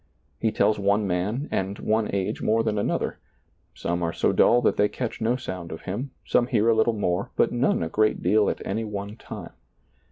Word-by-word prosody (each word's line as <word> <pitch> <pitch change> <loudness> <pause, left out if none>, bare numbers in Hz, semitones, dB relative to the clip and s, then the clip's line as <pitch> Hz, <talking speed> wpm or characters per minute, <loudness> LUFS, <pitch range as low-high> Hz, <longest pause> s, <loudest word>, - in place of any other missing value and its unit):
He 110 - +1
tells 105 0 +2
one 100 +1 +2
man 100 - -1
and 95 +1 -1
one 110 0 0
age 95 -1 -2
more 115 +1 +2
than 105 -2 0
another; - - -1 0.6
some 85 +1 -2
are 85 -1 0
so - - +1
dull 120 - +5
that - - +3
they 105 0 +3
catch 125 -3 -4
no 115 +2 +2
sound 95 -9 -6
of 80 - -7
Him, 110 +9 -4 0.2
some 120 - +2
hear 115 -3 +2
a 115 - +4
little 110 +1 +3
more, 100 -3 -1
but - - +3
none 120 -7 +1
a - - -1
great 110 +5 +1
deal 105 +3 +3
at - - -4
any 110 +4 -2
one 105 -1 -5
time. - - -9
105 Hz, 210 wpm, -25 LUFS, 95-115 Hz, 0.6 s, dull